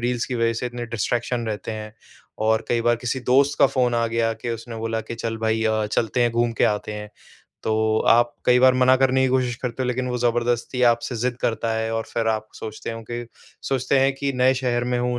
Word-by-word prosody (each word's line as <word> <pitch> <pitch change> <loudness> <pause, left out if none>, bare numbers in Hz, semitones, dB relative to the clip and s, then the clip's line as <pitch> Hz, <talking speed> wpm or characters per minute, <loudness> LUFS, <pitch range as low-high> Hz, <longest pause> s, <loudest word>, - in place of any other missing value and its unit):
Reels 120 0 -1
की 130 - -4
वजह 115 -1 +1
से 115 - -3
इतने 120 0 -5
डिस्ट्रैक्शन 120 +1 -2
रहते 110 0 -4
हैं। 110 0 -7 0.5
और 110 0 +2
कई 120 - +1
बार 120 0 +2
किसी 125 +2 -3
दोस्त 135 +3 +2
का - - +7
फ़ोन 125 -2 +1
आ 115 0 +1
गया 115 0 0
कि 120 - -5
उसने 115 0 -6
बोला 115 0 -2
कि 115 - -7
चल 115 -1 -3
भई 110 0 0
अ, 110 -1 +1
चलते 115 +3 -1
हैं 120 - +2
घूम 120 0 +1
के - - +6
आते 105 0 -1
हैं, 105 0 -7 0.5
तो 110 0 +1
आप 120 0 +4
कई 125 0 +6
बार 130 0 +6
मना 130 0 +5
करने 130 0 +3
की 130 - +2
कोशिश 125 -2 0
करते 125 0 -3
हो - - -1
लेकिन 125 +1 -1
वो 125 0 -2
जबरदस्ती 120 +1 0
आपसे 120 +1 -2
ज़िद 125 +1 -1
करता 115 0 0
है 110 0 -2
और 115 0 -1
फिर 115 -1 +1
आप 110 -1 -1
सोचते 110 +1 -6
हों 115 - -7
कि 120 0 -4 0.4
सोचते 135 +1 +1
हैं 135 +1 +3
कि 140 0 -2
नए 130 +1 +4
शहर 125 -2 -1
में 125 0 0
हूँ, 125 0 -1
120 Hz, 235 wpm, -23 LUFS, 115-125 Hz, 0.5 s, का